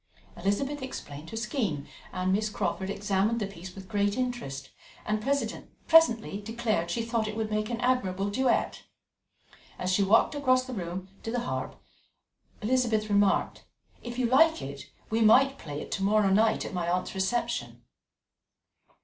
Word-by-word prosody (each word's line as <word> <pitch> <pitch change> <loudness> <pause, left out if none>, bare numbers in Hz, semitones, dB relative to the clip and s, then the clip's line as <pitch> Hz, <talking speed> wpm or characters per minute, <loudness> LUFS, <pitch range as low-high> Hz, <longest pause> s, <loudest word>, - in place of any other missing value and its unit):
Elizabeth 235 +11 -1
explained 160 - -7
her 225 - -6
scheme, 215 - -2 0.3
and 185 +1 0
Miss 215 +2 +1
Crawford 190 -2 -2
examined 205 +3 0
the 210 - -1
piece 185 -1 -9
with 190 -1 -10
great 205 0 0
interest, 190 - -3 0.3
and 215 0 0
presently 275 -3 +2
declared 220 -5 -1
she 230 +6 -1
thought 230 -1 -1
it 215 - -4
would 220 -1 -2
make 215 0 -1
an 235 -1 -3
admirable 200 -6 0
duet. 260 +4 +1 1.0
As 185 0 -1
she 200 - +3
walked 205 +8 +4
across 255 -3 +2
the 255 - -6
room 185 -1 -5
to - - -5
the 240 +1 -1
harp, 240 - -4 0.9
Elizabeth 225 -2 +1
remarked: 200 -1 +2 0.4
"If 240 0 -7
you 255 - +1
like 320 +7 +5
it, 140 +1 -8 0.2
we 225 +1 +1
might 270 +5 +5
play 145 -2 -6
it - - -8
to 195 - -2
morrow 205 0 +3
night 220 +3 +3
at - - -6
my 175 -2 -1
aunt's 180 +1 -1
reception." 195 +5 -2
215 Hz, 160 wpm, -28 LUFS, 190-240 Hz, 1.0 s, like